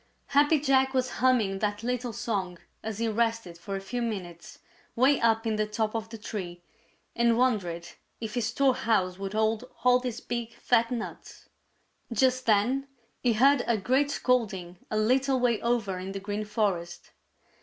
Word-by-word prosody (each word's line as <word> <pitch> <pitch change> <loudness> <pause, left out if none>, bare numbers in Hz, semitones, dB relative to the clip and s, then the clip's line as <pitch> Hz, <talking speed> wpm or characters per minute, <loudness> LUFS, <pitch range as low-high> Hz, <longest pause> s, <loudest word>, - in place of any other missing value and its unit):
Happy 290 +2 +4
Jack 265 -1 +2
was 255 -1 +1
humming 225 -7 +3
that 205 +1 -2
little 245 0 -2
song 200 -6 -3 0.2
as 220 -2 -5
he 230 0 0
rested 225 -4 -1
for 185 +4 -6
a - - -2
few 240 +6 -4
minutes 180 -7 -5 0.4
'way 265 +4 +4
up 225 0 +2
in 220 -1 0
the 215 0 0
top 215 0 -1
of 225 0 -3
the 225 - -8
tree 180 -5 -6 0.5
and 235 -1 +3
wondered 185 -9 0 0.3
if 220 -2 -5
his 240 -3 0
storehouse 230 -8 +1
would 195 0 -4
hold 220 +2 +1 0.2
all 250 0 +5
these 250 -2 -4
big, 235 -1 -5
fat 235 -1 +2
nuts. 240 -2 -7 0.6
Just 255 +2 +2
then 240 +6 +2 0.3
he 245 -2 +3
heard 270 +4 +4
a 235 - +2
great 260 +8 +1
scolding 195 -10 -1
a 215 - -1
little 260 +4 +2
way 240 -3 +1
over 225 -6 0
in 190 +1 -6
the 195 - -4
Green 205 +2 -4
Forest. 195 -5 -2
225 Hz, 165 wpm, -28 LUFS, 205-250 Hz, 0.6 s, all